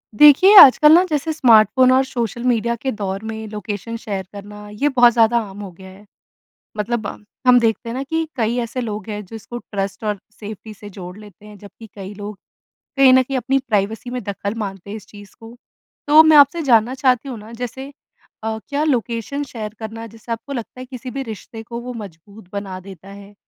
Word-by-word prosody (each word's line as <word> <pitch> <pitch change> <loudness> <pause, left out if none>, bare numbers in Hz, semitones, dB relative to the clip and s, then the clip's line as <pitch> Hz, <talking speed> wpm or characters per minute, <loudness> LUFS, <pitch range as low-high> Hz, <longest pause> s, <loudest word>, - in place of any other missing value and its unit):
देखिए, 300 - +7
आजकल 300 -1 +9
ना 350 +2 +7
जैसे 310 +1 -1
स्मार्टफ़ोन 255 -2 +5
और 260 +1 +4
सोशल 235 -2 -4
मीडिया 235 -1 +1
के 265 +3 -3
दौर 195 +1 -4
में 220 0 -7
लोकेशन 210 +2 -6
शेयर 200 -5 -5
करना, 205 +1 -10
ये 210 +8 -1
बहुत 245 -3 +5
ज़्यादा 230 0 +3
आम 195 +1 -11
हो 195 -2 -8
गया 190 +2 -14
है। 195 +2 -16 0.7
मतलब 215 0 -2
अ, - - -6 0.3
हम 245 0 +7
देखते 230 0 -1
हैं - - -4
ना 265 - -3
कि 320 +3 -2
कई 235 -1 -1
ऐसे 235 +2 -5
लोग 215 -2 -5
हैं, 210 0 -5
जो 205 - -11
इसको 225 +2 -8
ट्रस्ट 200 -3 -5
और 210 -2 -2
सेफ्टी 215 +1 -10
से 205 0 -12
जोड़ 180 -1 -10
लेते 210 -1 -15
हैं। 210 -1 -13
जबकि 205 +3 -14
कई 195 0 -8
लोग 205 0 -8 0.6
कहीं 270 -1 +7
न 260 - +6
कहीं 270 +1 -3
अपनी 265 +2 0
प्राइवेसी 220 -2 -2
में 250 0 -4
दखल 200 +1 -4
मानते 195 -3 -6
हैं, 210 - -5
इस 210 - -13
चीज़ 205 -1 -15
को। 225 +1 -12 0.5
तो 305 +2 +8
मैं 315 -1 +6
आपसे 290 +4 +5
जानना 240 -3 +3
चाहती 255 +1 +2
हूँ 245 - -6
ना 215 +2 -12
जैसे 250 +3 -7 0.5
अ, 220 0 -2
क्या 285 +1 -1
लोकेशन 255 0 -2
शेयर 215 -6 -7
करना, 225 +1 -7
जिससे 225 +1 -12
आपको 230 +5 -5
लगता 250 0 -7
है 255 - -7
किसी 255 -1 -8
भी 275 0 -4
रिश्ते 225 -1 -9
को 235 +1 -7
वो 250 0 -7
मजबूत 200 -1 -11
बना 195 -2 -5
देता 190 0 -13
है? 200 +1 -13
225 Hz, 210 wpm, -19 LUFS, 205-255 Hz, 0.7 s, आजकल